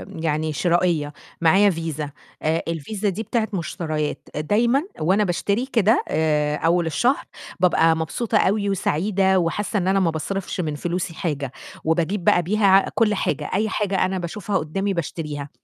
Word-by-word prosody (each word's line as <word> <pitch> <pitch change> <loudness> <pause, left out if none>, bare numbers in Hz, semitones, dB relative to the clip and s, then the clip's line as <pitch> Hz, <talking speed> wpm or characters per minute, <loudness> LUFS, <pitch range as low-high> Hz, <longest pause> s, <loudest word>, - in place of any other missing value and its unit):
يعني 155 -1 -1
شرائية، 170 -3 +1 0.3
معايا 190 +5 +5
فيزا 160 -4 -3 0.3
آآ 160 +2 0
الفيزا 180 +6 -2
دي 205 +4 -3
بتاعة 225 +1 -1
مشتريات، 155 -3 -3
دايمًا 235 - +2 0.2
وأنا 185 +7 +2
باشتري 200 +5 0
كده 225 -4 +2
آآ 150 -1 +1
أول 170 +2 +2
الشهر، 240 - +1 0.4
بابقى 165 -2 +4
مبسوطة 165 +8 -1
أوي 200 +1 +2
وسعيدة 190 +1 +1
وحاسّة 200 +5 -1
إن 180 - -2
أنا 195 +1 +3
ما 170 -4 +2
باصرفش 190 +5 -4
من 155 -3 -3
فلوسي 175 +3 -3
حاجة، 145 -6 -3 0.3
وباجيب 170 +4 0
بقى 175 - +4
بيها 195 +1 +4
كلّ 220 -2 +3
حاجة 200 - -2
أي 215 +3 +1
حاجة 200 -2 0
أنا 190 0 -2
باشوفها 190 +3 -2
قدَّامي 195 +6 -2
باشتريها، 150 -4 -4
175 Hz, 150 wpm, -22 LUFS, 160-200 Hz, 0.4 s, معايا